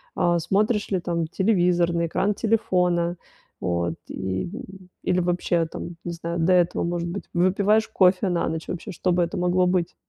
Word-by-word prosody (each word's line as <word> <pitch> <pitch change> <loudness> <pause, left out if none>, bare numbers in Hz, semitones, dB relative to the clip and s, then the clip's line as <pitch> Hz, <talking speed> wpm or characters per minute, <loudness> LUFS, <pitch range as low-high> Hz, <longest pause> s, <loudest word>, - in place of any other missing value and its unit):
а, 175 0 +2
смотришь 210 +5 +1
ли 185 -2 +1
там 170 -2 -2
телевизор, 180 -3 +2
на 170 0 +1
экран 190 +5 0
телефона, 180 -6 +1 0.4
вот 85 -1 -1
и, 95 - -3 0.5
или 185 0 +1
вообще, 175 -1 +1
там, 170 +1 -7
не 175 - -3
знаю, 170 0 -4
до 175 +3 +3
этого, 175 -1 +2
может 170 0 -2
быть, 185 +1 -5
выпиваешь 200 +5 +2
кофе 190 -1 +3
на 175 -1 0
ночь, 160 0 -4
вообще, 180 +4 -5
что 180 +1 -1
бы 175 0 +2
это 170 - -3
могло 180 +1 +2
быть? 180 -2 0
175 Hz, 170 wpm, -24 LUFS, 170-185 Hz, 0.5 s, до